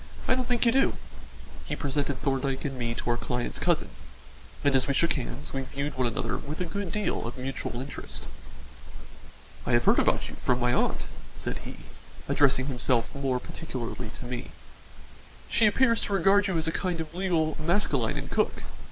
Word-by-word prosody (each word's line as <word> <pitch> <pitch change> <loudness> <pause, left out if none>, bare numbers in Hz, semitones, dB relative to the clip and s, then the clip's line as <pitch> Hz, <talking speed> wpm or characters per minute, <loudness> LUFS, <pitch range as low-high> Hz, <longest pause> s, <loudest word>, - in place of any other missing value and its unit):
I - - +5
don't 255 -1 0
think 245 -1 +2
you 235 - +6
do." 270 +3 +4 0.7
He - - -2
presented 140 -1 -1
Thorndyke 135 -1 0
and 135 -2 -2
me 120 -2 -2
to - - -3
our 120 - +1
client's 125 0 -2
cousin, - - +2 0.7
and 140 -1 +4
as 130 -1 +3
we 140 - +1
shook 170 - +3
hands, 140 +1 -5
we 135 - -1
viewed 140 +2 -4
one 130 -1 +2
another 115 - -1
with 150 +3 -6
a 180 - 0
good 185 +1 -3
deal 210 - -1
of 120 - -6
mutual 130 -2 -3
interest. 135 +2 -5 1.4
"I - - 0
have 120 0 +4
heard - - +6
about - - +2
you - - -8
from 125 -1 +2
my 125 0 +2
aunt," 125 - +1 0.3
said - - -3
he, - - -7 0.5
addressing 135 -2 +4
himself 125 -2 +1
more 135 -3 0
particularly 125 -7 -5
to - - -8
me. 120 0 -4 1.0
"She 220 - +5
appears 230 +2 +4
to 205 - -2
regard 195 +2 +5
you 190 -3 0
as 160 - +1
a - - +2
kind 175 0 -1
of 160 -1 -4
legal 170 -4 +1
Maskelyne 155 - +1
and - - -5
Cooke. - - +1
140 Hz, 185 wpm, -28 LUFS, 125-175 Hz, 1.4 s, you